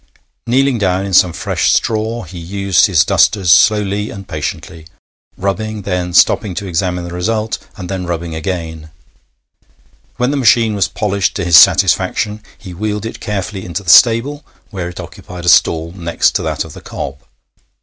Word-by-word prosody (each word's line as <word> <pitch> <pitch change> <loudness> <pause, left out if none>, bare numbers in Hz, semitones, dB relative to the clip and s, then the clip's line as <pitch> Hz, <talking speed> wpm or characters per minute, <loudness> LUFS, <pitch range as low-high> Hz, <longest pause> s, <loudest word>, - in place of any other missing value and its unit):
Kneeling 130 0 +2
down 95 -1 0
in 100 - -5
some 90 -1 +5
fresh - - -1
straw, 110 +1 -1
he 90 +1 -10
used 100 +3 +1
his 80 -5 +3
dusters 95 -1 +2
slowly 105 0 +3
and 100 -1 -10
patiently 80 -1 -6 0.5
rubbing, 105 +2 -3
then 90 -2 -2
stopping 95 -2 +3
to 100 - -4
examine 90 0 -2
the 85 0 -8
result, 110 +5 -2 0.2
and 90 -3 -7
then 90 -1 -4
rubbing 85 -1 -4
again. 80 -1 -5 1.3
When 125 +2 0
the 145 - -1
machine 115 -4 +3
was 100 -2 +1
polished 100 -2 -1
to 100 - -3
his 85 -1 +3
satisfaction, 105 +6 +4 0.2
he 95 -4 -10
wheeled 105 +3 -3
it 115 - -7
carefully 105 -2 -4
into 90 +3 -5
the 80 - +3
stable, 125 - +4 0.3
where 90 -4 -5
it 90 - -10
occupied 90 0 -9
a - - +3
stall 80 -1 +3
next 85 -2 0
to - - -1
that - - -3
of - - -11
the - - -12
cob. 70 +1 -7
95 Hz, 170 wpm, -15 LUFS, 85-105 Hz, 1.3 s, some